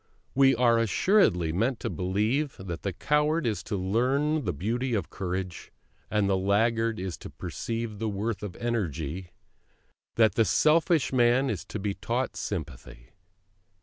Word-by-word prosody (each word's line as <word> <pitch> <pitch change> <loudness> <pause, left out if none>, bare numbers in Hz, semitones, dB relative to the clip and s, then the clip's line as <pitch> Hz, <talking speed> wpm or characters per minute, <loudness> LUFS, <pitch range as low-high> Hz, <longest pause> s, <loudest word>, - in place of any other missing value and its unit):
We 135 -1 +5
are 120 -1 +4
assuredly 110 - +3
meant 115 +7 0
to - - -2
believe 105 +10 -1
that 85 -3 -6
the 100 - -2
coward 150 - +1
is 110 -3 -1
to 105 - -2
learn 130 +11 +1
the - - +1
beauty 115 - -1
of 100 - -3
courage, 90 -2 -4 0.4
that 105 -2 +1
the 100 -1 +2
laggard 115 +3 +1
is 90 -2 -5
to - - -9
perceive 115 -2 -5
the 110 -1 -1
worth 105 +2 -3
of 100 -4 -6
energy, 90 - -3 0.9
that 110 -2 +4
the 115 - +3
selfish 155 - +3
man 125 +1 +3
is 95 -5 -4
to - - -6
be 100 0 -2
taught - - -2
sympathy. - - -6
110 Hz, 150 wpm, -27 LUFS, 95-125 Hz, 0.9 s, We